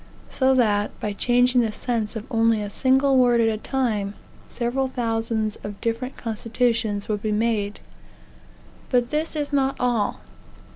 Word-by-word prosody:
So 265 0 +3
that, 210 -4 +1
by 210 - -3
changing 245 +3 +3
the 225 -2 0
sense 225 0 -2
of 220 0 -5
only 225 -2 +2
a 205 - -6
single 265 +3 +3
word 245 -2 +4
at 230 - +4
a 220 - -1
time, 215 -5 -1 0.3
several 255 +2 -1
thousands 225 -3 -1
of 205 -1 -8
different 235 +3 -3
constitutions 225 -2 -1
would 210 -2 -2
be 215 - -1
made. 210 -1 0 1.1
But 245 -2 +1
this 310 +2 -1
is 295 -1 -3
not 270 -1 +2
all. 240 -4 0
230 Hz, 150 wpm, -23 LUFS, 215-255 Hz, 1.1 s, word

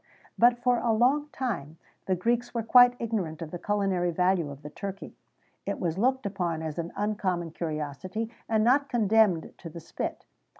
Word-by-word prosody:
[XVII - - -29
102] - - -18 0.2
But 240 - -27
for 250 -1 +3
a 235 - +1
long 265 +7 +3
time 185 - -4 0.3
the 190 - +2
Greeks 240 +6 -1
were 230 - 0
quite 245 +2 +7
ignorant 200 -9 -2
of 155 - -8
the 175 - -5
culinary 195 -3 0
value 180 -2 +1
of 140 +1 -10
the 150 - -8
turkey; 195 +2 -7 0.5
it - - -2
was 175 0 -2
looked 260 +2 +1
upon 175 -5 -2
as 160 +1 -4
an 170 0 -4
uncommon 185 -5 -1
curiosity, 165 +8 -4 0.2
and 220 -1 +2
not 275 +4 +3
condemned 215 -7 +2
to 165 - -8
the 170 +2 -9
spit. - - -5
195 Hz, 185 wpm, -28 LUFS, 170-230 Hz, 0.5 s, quite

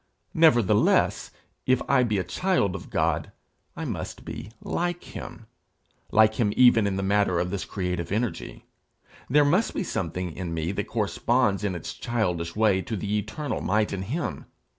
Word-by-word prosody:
Nevertheless, 140 - +3 0.4
if 130 -1 +4
I 140 -2 +4
be 110 -4 +1
a 95 - 0
child 180 - 0
of - - -8
God, - - 0 0.5
I - - -4
must - - -5
be - - -7
like 175 0 -2
him, - - -9 0.7
like 110 +1 +4
him 105 -4 +2
even 120 -4 +6
in 100 - -1
the 95 - -2
matter 100 -3 +2
of 90 +1 -1
this 100 -4 -3
creative 90 -3 -3
energy. 110 +2 -3 0.6
There 145 +3 +5
must 180 +10 +2
be - - -1
something 90 - -3
in 85 -3 -4
me 80 +2 -1
that 100 0 -3
corresponds 110 0 +1
in 100 -3 -1
its 85 - -6
childish 90 -8 -2
way 105 -3 +3
to 110 - -4
the 105 +2 -2
eternal 115 +7 -4
might 105 +2 +1
in 95 - -3
him. 140 - -4
105 Hz, 165 wpm, -26 LUFS, 95-125 Hz, 0.7 s, even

